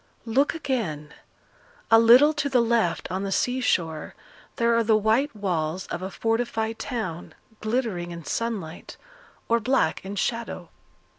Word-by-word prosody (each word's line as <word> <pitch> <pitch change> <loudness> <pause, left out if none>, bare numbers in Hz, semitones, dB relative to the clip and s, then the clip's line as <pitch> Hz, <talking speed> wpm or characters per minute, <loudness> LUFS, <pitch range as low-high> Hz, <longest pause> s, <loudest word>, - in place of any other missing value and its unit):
Look 265 +7 +1
again; 180 - -3 0.8
a 225 - +8
little 250 +7 +7
to 285 -2 -1
the 255 -2 +3
left 230 -9 +1
on 190 +1 -2
the 195 0 -3
sea 250 +6 0
shore 160 -9 -1 0.4
there 235 0 +2
are 230 - +3
the 220 -1 +4
white 225 +6 +1
walls 180 -3 -2
of 175 - -3
a 190 - -4
fortified 225 +1 -1
town, 215 -10 -5 0.2
glittering 215 -6 -2
in 170 -2 -8
sunlight, 205 -8 -4 0.5
or 230 0 +3
black 230 -8 +1
in 195 +1 -6
shadow. 230 +3 -3
225 Hz, 145 wpm, -25 LUFS, 180-235 Hz, 0.8 s, a